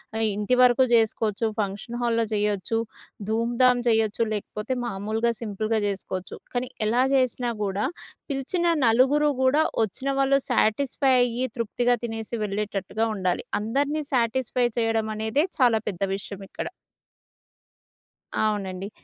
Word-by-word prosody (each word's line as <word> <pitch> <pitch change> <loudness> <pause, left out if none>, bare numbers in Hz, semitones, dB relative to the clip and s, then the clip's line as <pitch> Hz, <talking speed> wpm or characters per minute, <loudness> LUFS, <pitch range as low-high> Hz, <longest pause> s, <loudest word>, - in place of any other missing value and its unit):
ఆహ్, 225 0 +1
ఇంటి 210 +5 +1
వరకు 250 +1 +6
జేసుకోవచ్చు, 225 -1 +2
ఫంక్షన్ 210 +4 -3
హాల్‌లో 230 -1 +2
జేయ్యొచ్చు, 210 +1 0 0.5
ధూంధాం 240 +3 +3
చేయొచ్చు 220 0 +2
లేకపోతే 210 +4 -3
మామూలుగా 220 +2 -1
సింపుల్‌గా 215 +1 -1
జేసుకోవచ్చు. 190 -2 -5 0.2
కానీ 245 0 -1 0.2
ఎలా 245 +3 +3
జేసినా 250 -2 +1
గూడా 200 +1 -1 0.5
పిలిచిన 280 +6 -1 0.2
నలుగురు 270 +6 +4
గూడా, 280 +4 +4 0.2
వచ్చిన 260 +6 -3
వాళ్ళు 275 0 +4
సాటిస్‌ఫై 265 +4 +2
అయ్యి 245 +1 +1
తృప్తిగా 240 +2 +1
తినేసి 225 0 -4
వెళ్ళేటట్టుగా 205 +2 -2
ఉండాలి. 185 +3 -1 0.2
అందరిని 285 +7 0
సాటిస్‌ఫై 245 0 +1
చేయడమనేదే 220 +5 0
చాలా 235 -3 +4
పెద్ద 195 -1 -4
విషయమిక్కడ. 195 -1 -7 1.7
అవునండి. 195 -2 -2
225 Hz, 110 wpm, -25 LUFS, 210-250 Hz, 1.7 s, వరకు